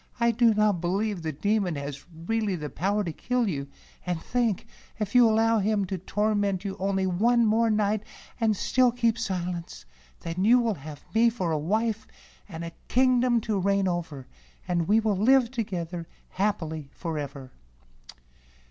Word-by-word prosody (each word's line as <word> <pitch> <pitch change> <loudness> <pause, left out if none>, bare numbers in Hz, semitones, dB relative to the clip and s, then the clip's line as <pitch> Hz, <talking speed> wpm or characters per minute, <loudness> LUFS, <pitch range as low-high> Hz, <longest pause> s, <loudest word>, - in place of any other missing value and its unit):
"I 235 0 +4
do 230 0 +4
not 210 -4 +2
believe 195 +2 -1
the 160 -1 -2
Demon 200 +2 0
has 140 0 -6
really 195 +5 -2
the 150 -4 -6
power 200 +7 0
to 165 -4 -4
kill 250 +6 -1
you; 140 -7 -3 0.4
and 180 -2 -2
think, 230 0 -1 0.3
if 210 -3 -3
you 245 -2 +7
allow 225 +1 +3
him 205 0 +1
to 190 0 -4
torment 205 0 0
you 195 - -3
only 195 0 0
one 230 +6 +3
more 225 +1 +3
night 210 -1 +1 0.4
and 220 -3 +2
still 255 +4 +3
keep 235 -1 +1
silence, 175 -2 -4 0.4
then 170 +3 -3
you 235 +4 +6
will 235 -3 +1
have 150 -3 -10
me 230 +1 +5
for 190 -8 -2
a 155 - 0
wife, 215 +7 -1 0.4
and 165 -2 -6
a 165 0 -6
kingdom 250 -1 +3
to 215 -2 -1
reign 195 0 +1
over, 165 -7 -3 0.4
and 170 -2 0
we 215 +2 +4
will 215 -2 +1
live 250 +3 +4
together 175 -8 -4 0.2
happily 160 -8 -2
forever." 145 -6 -5
200 Hz, 165 wpm, -27 LUFS, 170-225 Hz, 0.4 s, you